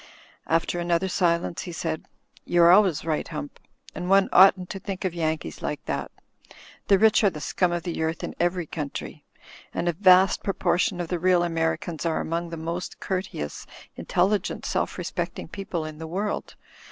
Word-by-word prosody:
After 165 +2 +1
another 175 +2 +1
silence 170 -4 0
he 175 - -6
said, 160 -1 -4 0.4
"You're 175 0 +5
always 185 -6 +4
right. 155 -2 -1
Hump, 150 -2 -7 0.3
and 180 0 -5
one 195 0 +5
oughtn't 185 -1 +6
to 195 - -5
think 195 0 -5
of 185 - -1
Yankees 160 - -3
like - - -4
that. - - -3 0.8
The 200 - +6
rich 220 +2 +4
are 205 - +6
the 155 - -8
scum 175 +5 0
of 175 -1 -2
the 170 -2 -3
earth 160 +1 -2
in - - -4
every 175 0 0
country. 150 -2 -6 0.5
And 175 - -1
a 175 - +2
vast 185 +1 +5
proportion 180 -1 0
of 170 -2 -3
the 175 - -1
real 180 0 +3
Americans 165 0 -1
are 165 -2 0
among 170 +1 -2
the 165 - -6
most 170 +3 -5
courteous, 185 - -4 0.3
intelligent, 200 +1 0
self - - -1
respect - - -3
ing - - -7
people 185 -5 -4
in 155 -1 -8
the 160 - -6
world. 200 +5 -3
175 Hz, 175 wpm, -25 LUFS, 165-185 Hz, 0.8 s, oughtn't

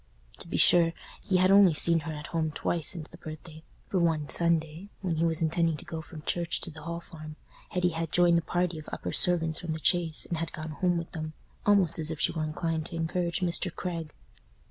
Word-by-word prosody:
To - - -9
be - - -2
sure, 170 -1 +5 0.3
he 190 -4 +1
had 185 +1 +4
only 195 -5 +6
seen 170 +2 +4
her 160 +1 -6
at 150 -1 -7
home 160 -1 0
twice 165 -1 -1
since 165 -4 +1
the 170 - -14
birthday; 155 0 -10 0.3
for 190 - 0
one 160 -4 +1
Sunday, 170 +3 +1
when 175 -4 -2
he 165 - +2
was 165 -1 0
intending 165 0 +1
to - - -3
go 160 -1 -5
from 160 -2 -11
church 170 0 -1
to 170 - -4
the 160 0 -11
Hall 170 +2 -5
Farm, 155 -2 -11 0.3
Hetty 180 -1 +1
had 165 -1 -4
joined 175 -1 +4
the - - -4
party 175 0 -1
of 155 - -10
upper - - -4
servants 165 -3 +5
from 170 -2 -4
the 160 - -5
Chase 165 -1 +1
and 170 - -3
had 165 - -4
gone 155 0 -6
home 175 +4 0
with 170 -1 -5
them—almost 165 +3 -1
as 155 -1 -3
if 160 -2 -5
she - - +2
were 160 - -3
inclined 160 +1 -2
to 170 - -8
encourage 170 +2 -1
Mr. 175 0 -1
Craig. 165 -3 -5
165 Hz, 225 wpm, -28 LUFS, 160-175 Hz, 0.3 s, only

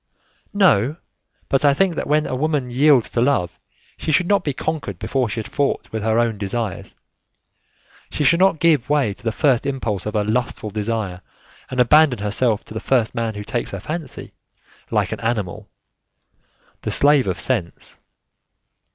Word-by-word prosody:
"No, 150 - +3 0.5
but 135 - +1
I 140 -1 +5
think 190 +2 +2
that - - -4
when 150 +1 +2
a - - -4
woman 140 -2 -1
yields 135 -1 +4
to 115 - 0
love, 90 - 0 0.4
she - - -2
should 175 +4 +3
not 200 -1 +2
be 145 - -1
conquered 140 - -4
before 120 +4 -1
she 115 - -3
has - - -9
fought 140 -1 -2
with 110 - -3
her 110 +1 +1
own 115 -3 +1
desires; 105 0 -4 1.1
she 150 - -2
should 170 +5 +4
not 190 -3 +4
give 150 -6 +2
way 145 -8 +2
to 125 - -19
the 115 - 0
first 125 +2 +2
impulse 110 -9 -2
of 105 - -4
a 105 - +2
lustful 110 0 -2
desire 105 -3 -3 0.5
and 130 - -4
abandon 140 +1 +5
herself 105 +2 0
to - - -11
the 110 - -3
first 120 -3 +1
man 115 -3 -2
who 105 - -5
takes 120 +3 -3
her 100 - -5
fancy, 155 - -6 0.6
like - - 0
an - - -4
animal 110 -6 -3 1.1
the - - -3
slave 145 -4 +3
of 95 0 -2
sense. 100 -7 -3
125 Hz, 175 wpm, -21 LUFS, 105-145 Hz, 1.1 s, I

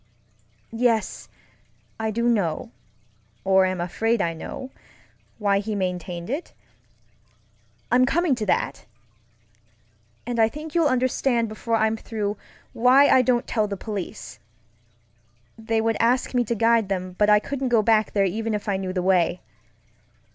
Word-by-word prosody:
Yes, 230 -2 0 0.7
I 220 0 -1
do 235 +2 -1
know, 180 - 0 0.7
or 190 0 +4
am 185 -1 -2
afraid 225 +7 0
I 170 -3 0
know, 260 +10 -8 0.7
why 200 -2 +1
he 210 +1 -3
maintained 180 -2 -3
it. 285 +9 -4 1.4
I'm 255 +1 +4
coming 340 +1 +2
to 230 -4 -2
that. 145 - -1 1.4
And 240 0 -3
I 220 0 +5
think 300 +4 -8
you'll 335 -3 +3
understand 255 -2 +1
before 225 +2 -2
I'm 220 0 +1
through 210 -2 -3 0.4
why 255 +4 +5
I 260 - +6
don't 245 -1 +1
tell 215 -2 0
the 200 -1 -5
police. 190 - -6 1.2
They 225 0 -1
would 225 0 0
ask 245 +3 +1
me 245 -1 +2
to 235 - -1
guide 230 -2 +2
them, 185 -1 -3
but 210 0 +4
I 210 - +7
couldn't 265 +4 -3
go 230 -3 +3
back 220 0 +2
there 200 -1 +2
even 220 +3 -2
if 210 - -5
I 200 -2 0
knew 190 -1 -4
the 180 -1 -1
way. 180 -1 +2
220 Hz, 145 wpm, -24 LUFS, 195-240 Hz, 1.4 s, I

